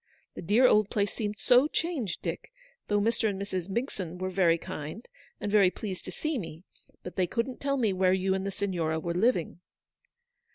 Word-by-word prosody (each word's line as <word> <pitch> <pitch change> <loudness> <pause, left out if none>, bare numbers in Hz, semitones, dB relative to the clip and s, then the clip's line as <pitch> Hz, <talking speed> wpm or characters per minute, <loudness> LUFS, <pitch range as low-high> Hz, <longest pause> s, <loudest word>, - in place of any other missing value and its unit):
The - - -7
dear 210 +9 +4
old 215 -4 +5
place 205 -1 0
seemed 210 -1 -3
so 250 +6 +5
changed, 305 - -2
Dick, - - -4 0.4
though 205 0 +2
Mr. 225 +1 +1
and 195 -1 -4
Mrs. 185 -3 -3
Migson 190 -6 -3
were 185 +1 -3
very 175 -3 +3
kind, 155 +7 -7 0.3
and 205 - -3
very 200 -3 +6
pleased 190 -1 -6
to - - -6
see 310 -4 -2
me, 165 -3 -8 0.4
but 180 - -8
they 185 -1 +2
couldn't 235 +6 -3
tell 275 0 0
me 220 -6 +2
where 185 0 +3
you 190 0 +2
and 190 0 -1
the 200 - -2
Siguora 175 -6 -1
were 170 +2 -3
living." 180 -3 +1
200 Hz, 195 wpm, -29 LUFS, 180-230 Hz, 0.4 s, very